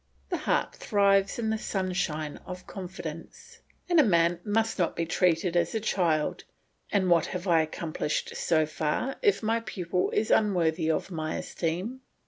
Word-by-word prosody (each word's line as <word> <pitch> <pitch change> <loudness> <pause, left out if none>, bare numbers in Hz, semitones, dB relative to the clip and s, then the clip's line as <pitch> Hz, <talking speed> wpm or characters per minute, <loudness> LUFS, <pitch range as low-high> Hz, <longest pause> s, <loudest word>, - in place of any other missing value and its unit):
The - - +1
heart - - 0
thrives 200 -1 +2
in 220 -2 -1
the 220 - -1
sunshine 180 -7 -2
of 180 0 -8
confidence, 175 -4 -8 0.3
and 350 -2 +4
a - - +8
man 170 -5 +3
must 220 0 0
not 175 - +1
be 165 - -1
treated 170 +1 +1
as 170 +3 +1
a - - +2
child; 170 -8 0 0.5
and 195 -2 +2
what 170 -2 +4
have 180 +1 -5
I 165 -2 +5
accomplished 155 -1 -3
so 160 -2 +2
far, 155 - -2
if 410 - +2
my 225 +1 +2
pupil 185 -5 -2
is 215 - 0
unworthy 170 -6 +2
of 160 +4 -1
my 155 -2 -3
esteem? 185 +10 -3
180 Hz, 160 wpm, -28 LUFS, 165-205 Hz, 0.5 s, a